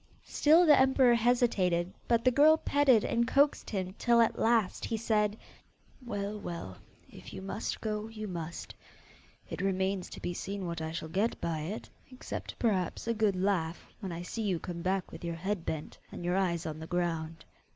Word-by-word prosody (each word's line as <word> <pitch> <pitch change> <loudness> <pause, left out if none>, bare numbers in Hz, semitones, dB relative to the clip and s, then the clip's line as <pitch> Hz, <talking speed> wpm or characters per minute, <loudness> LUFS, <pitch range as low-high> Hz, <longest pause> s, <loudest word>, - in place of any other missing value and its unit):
Still 320 +4 +5
the 300 -3 +8
emperor 265 -2 +5
hesitated, 220 -7 +2
but 235 0 +2
the 255 - +6
girl 305 +4 +6
petted 280 -8 +3
and 235 0 +1
coaxed 280 +2 +2
him 185 -3 -3
till 235 -1 +4
at 230 - +3
last 225 -4 +2
he 225 - -1
said, 210 -1 +1 0.7
'Well, 210 -3 -4
well, 170 - -6 0.3
if - - -12
you - - -5
must 195 +3 -4
go, 215 -1 -3
you 215 -1 -7
must. 170 -3 -6 0.7
It - - -5
remains 190 0 -1
to - - -9
be 175 - -3
seen 195 +2 -5
what 170 -1 -4
I 160 0 -3
shall 160 -1 -5
get 195 +8 -1
by 165 -2 -2
it, 175 +8 -5 0.2
except 255 -1 -7
perhaps 195 -7 0
a 230 - +2
good 215 -3 +1
laugh 180 -3 -1
when 195 -5 -5
I 170 +1 -5
see 225 +5 -5
you 195 -5 0
come 170 0 -6
back 185 +1 -1
with - - -10
your 170 -1 -3
head 190 +1 -3
bent 155 -1 -4
and 175 - -7
your 175 +1 +1
eyes 175 -3 0
on 155 -1 -5
the 160 - -7
ground. 165 -2 -2
195 Hz, 190 wpm, -31 LUFS, 175-230 Hz, 0.7 s, the